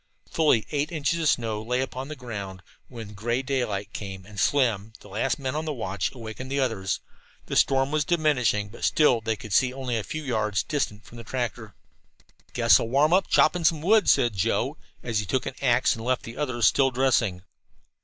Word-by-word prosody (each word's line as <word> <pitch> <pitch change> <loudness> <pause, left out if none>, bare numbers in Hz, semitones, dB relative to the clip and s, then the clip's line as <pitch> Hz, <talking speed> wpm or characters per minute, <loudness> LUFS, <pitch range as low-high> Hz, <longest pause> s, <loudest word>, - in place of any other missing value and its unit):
Fully 150 -9 +3
eight 150 +1 -1
inches 165 +1 -1
of 160 -2 +2
snow 110 -3 0
lay 125 +3 -1
upon 130 0 -4
the 155 - -6
ground 100 -7 -7 0.2
when 115 -4 -9
gray 120 +5 -2
daylight 110 -7 -2
came 95 -2 -7
and 105 0 -9
Slim, 110 -5 +1
the - - -14
last 115 +5 -1
man 135 -1 -3
on 155 +1 -3
watch, 100 - -2
awakened 120 +2 -8
the 140 - 0
others. 110 -8 -1 0.4
The - - -4
storm 135 +1 +3
was 155 -1 +1
diminishing, 140 -11 +1
but - - -12
still 130 -7 +3
they 110 0 -1
could 105 -1 -8
see 130 -2 +4
only 130 -2 -3
a 110 - -1
few 155 +7 -5
yards 110 -6 0
distant 110 -8 -3
from 120 - -12
the - - -8
tractor. 115 -2 -4 0.8
"Guess - - +5
I'll - - -2
warm 145 +6 +3
up 190 +1 +3
chopping 175 -1 +3
some 160 -2 +2
wood," 215 +4 +4
said 120 -3 +4
Joe, 95 - 0 0.3
as 115 -3 -1
he 105 - -3
took 130 +6 -1
an - - -4
axe 125 -2 +3
and 115 - -8
left 130 +1 0
the 115 - -8
others 125 -6 -1
still 135 -1 +4
dressing. 120 -8 +1
125 Hz, 200 wpm, -26 LUFS, 110-140 Hz, 0.8 s, Guess